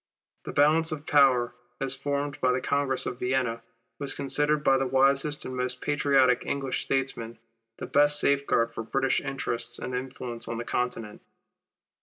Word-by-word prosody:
The - - -5
balance 160 +3 +3
of 155 -1 -5
power, 130 -5 +4 0.3
as 135 -1 +2
formed 140 +1 -3
by 130 - +3
the 130 - 0
Congress 140 -1 0
of 125 - -5
Vienna, 125 -2 -1 0.4
was 140 -1 -2
considered 150 +2 +1
by 135 -2 +4
the 135 - 0
wisest 135 +3 +2
and 130 - -5
most 125 0 -3
patriotic 135 -4 +2
English 135 -2 -2
statesmen, 130 -4 -2 0.4
the - - -6
best 145 +1 +4
safeguard 140 -5 +1
for - - -5
British 135 +4 0
interests 135 -4 -3
and 125 - -6
influence 125 -2 -5
on 115 - -4
the 115 - -5
Continent. 120 -4 -3
135 Hz, 160 wpm, -27 LUFS, 125-140 Hz, 0.4 s, power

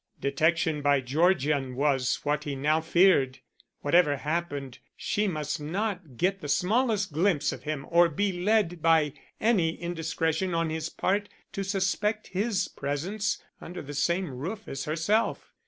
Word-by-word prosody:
Detection 155 +2 +1
by 145 -1 +3
Georgian 140 -1 +1
was 135 -2 +1
what 150 0 0
he 145 -2 -3
now 150 +4 +1
feared. 160 -6 +4 0.4
Whatever 145 -1 +3
happened, 145 -4 -3 0.2
she 210 +1 0
must 155 -5 -2
not 175 - -3
get 190 +5 0
the 145 - -5
smallest 210 - +1
glimpse 160 -2 +2
of - - -9
him 150 -2 -3
or 170 0 +5
be 200 +6 0
led 180 -2 +1
by 160 -3 +3 0.3
any 185 -8 +2
indiscretion 165 +1 -1
on 165 -1 0
his 160 0 -3
part 205 +4 -1 0.2
to 195 - -3
suspect 200 +2 -1
his 200 +2 0
presence 175 +10 -3 0.2
under 175 +1 -7
the 145 +1 -8
same 170 +3 0
roof 185 - -6
as 135 0 -5
herself. 170 +9 0
165 Hz, 145 wpm, -28 LUFS, 145-190 Hz, 0.4 s, or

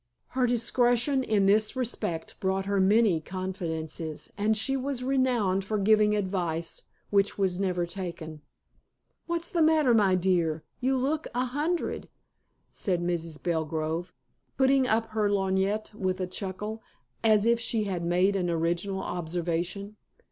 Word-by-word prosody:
Her 255 -1 +1
discretion 245 +3 +2
in 210 -6 +2
this 210 +4 +3
respect 220 -10 -3
brought 190 0 0
her 200 0 +1
many 200 -2 +4
confidences, 165 -4 -5
and 210 +1 +1
she 270 +5 0
was 265 -1 -2
renowned 250 -8 +1
for 215 +2 -2
giving 210 +1 +4
advice 175 -5 -2 0.3
which 200 0 +2
was 190 -2 0
never 180 -3 0
taken. 170 -4 -6 0.9
"What's 340 +1 -2
the 345 -4 +1
matter, 310 -5 +4
my 200 -4 +4
dear? 170 -4 +1 0.2
You 260 +1 +1
look 290 +5 -1
a 250 +1 +1
hundred," 300 +7 -2 0.6
said 185 -4 -1
Mrs. 170 -3 -3
Belgrove, 160 0 -2 0.5
putting 265 -1 +4
up 225 0 +2
her 215 -2 +1
lorgnette 195 +2 0
with 185 -2 -2
a 185 - 0
chuckle, 200 +4 -5 0.4
as 215 -2 +4
if 235 0 +3
she 225 -1 -1
had 185 -4 -3
made 180 +3 +2
an 180 -2 0
original 170 +4 -1
observation. 175 +4 -3
195 Hz, 140 wpm, -28 LUFS, 175-230 Hz, 0.9 s, many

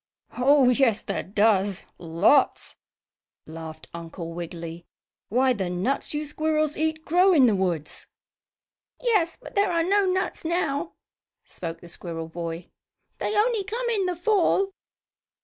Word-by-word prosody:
"Oh, 270 +1 +5
yes 250 -4 +3
there 200 - -2
does 200 -1 +1
lots!" 175 - +2 0.7
laughed 160 0 -9
Uncle 165 0 -7
Wiggily. 170 0 -7 0.5
"Why 255 +3 +3
the 190 -6 -3
nuts 195 +12 -1
you 300 +1 -2
squirrels 310 0 0
eat 315 0 -1
grow 365 +3 +4
in 280 -6 +6
the 230 - +4
woods." 175 -6 -2 0.9
"Yes, 415 -9 +1
but - - -12
there 400 -2 +2
are 335 -1 +2
no 395 +2 +2
nuts 375 +1 -1
now," 325 -1 -1 0.5
spoke 165 -1 -7
the 175 - -12
squirrel 165 -1 -6
boy. 170 +1 -6 0.5
"They 425 - -1
only 440 -1 +2
come 470 +5 -3
in 400 -5 +1
the 360 - -1
Fall." 390 +1 +2
265 Hz, 135 wpm, -25 LUFS, -, 0.9 s, in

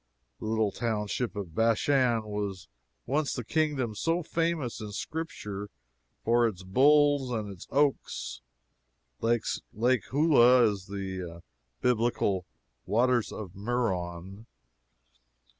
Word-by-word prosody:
The - - -7
little 110 -2 +1
township 110 +1 -2
of 95 -6 -5
Bashan 115 - +2
was 105 -3 -4 0.4
once 145 +2 0
the 125 - -3
kingdom 145 -4 0
so 165 +10 0
famous 165 -8 -1
in 105 -1 -6
Scripture 105 -9 -5 0.6
for 120 +1 +4
its 95 -4 -5
bulls 145 +6 +4
and 110 -4 -2
its 95 - -11
oaks. 140 - 0 0.8
Lake 115 0 0
Huleh 125 -6 +5
is 95 -2 -7
the 95 -4 -5 0.4
Biblical 115 -6 +1 0.4
"Waters 120 +3 +2
of 100 -5 -7
Merom." 100 -3 -3
115 Hz, 105 wpm, -29 LUFS, 100-130 Hz, 0.8 s, Huleh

